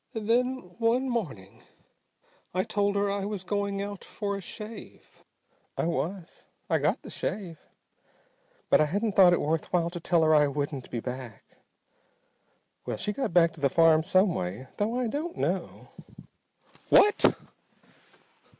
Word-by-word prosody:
Then 235 Hz, -1 st, 0 dB
one 240 Hz, +3 st, +2 dB
morning 145 Hz, -, -4 dB, 0.9 s
I 185 Hz, -, +2 dB
told 200 Hz, 0 st, 0 dB
her 200 Hz, 0 st, +1 dB
I 200 Hz, 0 st, -2 dB
was 200 Hz, -2 st, -4 dB
going 200 Hz, 0 st, -2 dB
out 200 Hz, -1 st, -7 dB
for 200 Hz, -2 st, -4 dB
a 200 Hz, -, -5 dB
shave. 215 Hz, +3 st, -11 dB, 0.5 s
I -, -, 0 dB
was. 170 Hz, +1 st, -4 dB, 0.2 s
I -, -, +3 dB
got -, -, 0 dB
the -, -, -9 dB
shave. 185 Hz, -5 st, -4 dB, 1.1 s
But -, -, +6 dB
I -, -, +4 dB
hadn't 205 Hz, +8 st, -1 dB
thought 185 Hz, -2 st, +7 dB
it 175 Hz, -, +3 dB
worth 160 Hz, +1 st, -1 dB
while 170 Hz, -1 st, +1 dB
to 175 Hz, -, -5 dB
tell 170 Hz, -1 st, +2 dB
her 155 Hz, 0 st, +4 dB
I 150 Hz, -1 st, +5 dB
wouldn't 140 Hz, -2 st, -4 dB
be 120 Hz, -, -4 dB
back. 125 Hz, -3 st, -7 dB, 1.4 s
Well, -, -, -4 dB
she 210 Hz, -, -2 dB
got 270 Hz, -2 st, -2 dB
back 170 Hz, -1 st, +4 dB
to 160 Hz, -, -14 dB
the 140 Hz, -, +3 dB
farm 160 Hz, +1 st, +5 dB
some 185 Hz, +3 st, +3 dB
way, 95 Hz, -, -4 dB
though 220 Hz, +4 st, 0 dB
I 250 Hz, -, 0 dB
don't 310 Hz, +8 st, -4 dB
know -, -, -3 dB, 0.5 s
" -, -, -32 dB
"What!" 415 Hz, +1 st, +5 dB
185 Hz, 155 wpm, -28 LUFS, 160-210 Hz, 1.4 s, thought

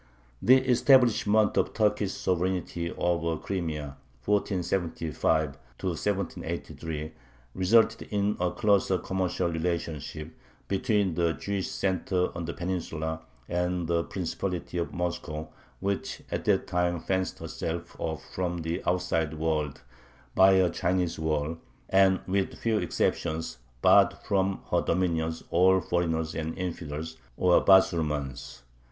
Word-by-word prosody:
The 125 Hz, +7 st, +7 dB
establishment 120 Hz, -5 st, +4 dB
of -, -, +1 dB
Turkish 105 Hz, -2 st, +1 dB
sovereignty 90 Hz, -1 st, -1 dB
over 85 Hz, -2 st, 0 dB
the -, -, -6 dB
Crimea 75 Hz, -7 st, -4 dB, 0.3 s
(1475 85 Hz, -7 st, 0 dB, 0.2 s
1783) 80 Hz, -4 st, -3 dB, 0.4 s
resulted 110 Hz, +4 st, +3 dB
in 105 Hz, 0 st, +1 dB
a 90 Hz, 0 st, +2 dB
closer 100 Hz, -3 st, +2 dB
commercial 95 Hz, -1 st, -1 dB
relationship 80 Hz, -2 st, -3 dB, 0.3 s
between 100 Hz, -2 st, +1 dB
the 85 Hz, 0 st, +1 dB
Jewish 100 Hz, 0 st, -3 dB
center 95 Hz, -1 st, 0 dB
on 85 Hz, 0 st, -4 dB
the 85 Hz, -, -4 dB
Peninsula 80 Hz, -3 st, -3 dB, 0.3 s
and 90 Hz, 0 st, -1 dB
the 85 Hz, 0 st, +1 dB
Principality 90 Hz, -1 st, -3 dB
of 85 Hz, -, -2 dB
Moscow, 85 Hz, -3 st, -4 dB, 0.3 s
which 100 Hz, 0 st, -3 dB
at -, -, -3 dB
that -, -, +2 dB
time 90 Hz, -1 st, 0 dB
fenced 95 Hz, +2 st, -1 dB
herself 85 Hz, +1 st, -5 dB
off 80 Hz, -1 st, -3 dB
from 90 Hz, -1 st, -1 dB
the 80 Hz, +1 st, -2 dB
outside 80 Hz, -3 st, 0 dB
world 75 Hz, -4 st, -1 dB, 0.5 s
by 95 Hz, 0 st, +6 dB
a 95 Hz, -2 st, +4 dB
Chinese 90 Hz, -2 st, 0 dB
wall, 80 Hz, +1 st, -1 dB, 0.3 s
and, 95 Hz, -1 st, +4 dB
with 95 Hz, +1 st, -1 dB
few 110 Hz, -2 st, +1 dB
exceptions, 80 Hz, -8 st, -1 dB, 0.2 s
barred -, -, +6 dB
from 95 Hz, -1 st, +1 dB
her -, -, +3 dB
dominions 80 Hz, -2 st, 0 dB
all 95 Hz, +2 st, +5 dB
foreigners 80 Hz, -2 st, -1 dB
and 80 Hz, 0 st, -4 dB
infidels, 80 Hz, -3 st, -5 dB, 0.2 s
or 90 Hz, -1 st, +4 dB
"Basurmans." 75 Hz, -9 st, +2 dB
90 Hz, 120 wpm, -28 LUFS, 80-95 Hz, 0.5 s, The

